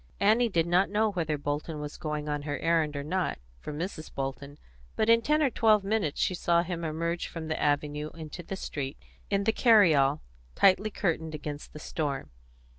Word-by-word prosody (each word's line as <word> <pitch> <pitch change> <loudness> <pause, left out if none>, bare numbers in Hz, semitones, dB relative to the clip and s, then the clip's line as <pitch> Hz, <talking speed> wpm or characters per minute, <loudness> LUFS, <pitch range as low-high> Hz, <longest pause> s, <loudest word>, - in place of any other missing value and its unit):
Annie 225 +4 +4
did 165 -5 +1
not 180 +3 +3
know 215 +1 +2
whether 160 -5 -1
Bolton 145 +2 -3
was 150 0 -6
going 150 -1 -4
on 145 -1 -2
her 145 0 -3
errand 165 -3 +1
or 140 - -3
not, 180 +4 -1 0.2
from 145 - -6
Mrs. 165 -2 -5
Bolton, 140 +1 -5 0.4
but 220 - +1
in 230 0 +6
ten 300 +5 +2
or 270 - +2
twelve 215 -3 +4
minutes 195 -7 -1
she - - +2
saw 170 -1 +2
him 175 -1 -4
emerge 170 +2 -2
from 160 -2 -7
the 160 - -2
avenue 150 +1 0
into 160 +1 -7
the 185 +3 -6
street, 140 -6 -5 0.3
in 200 0 +1
the 220 +2 +2
carry 215 -8 +6
all, 140 +1 +2 0.3
tightly 195 +2 +4
curtained 160 -6 -2
against 150 0 -6
the - - -10
storm. 145 -3 -3
165 Hz, 190 wpm, -29 LUFS, 150-195 Hz, 0.4 s, in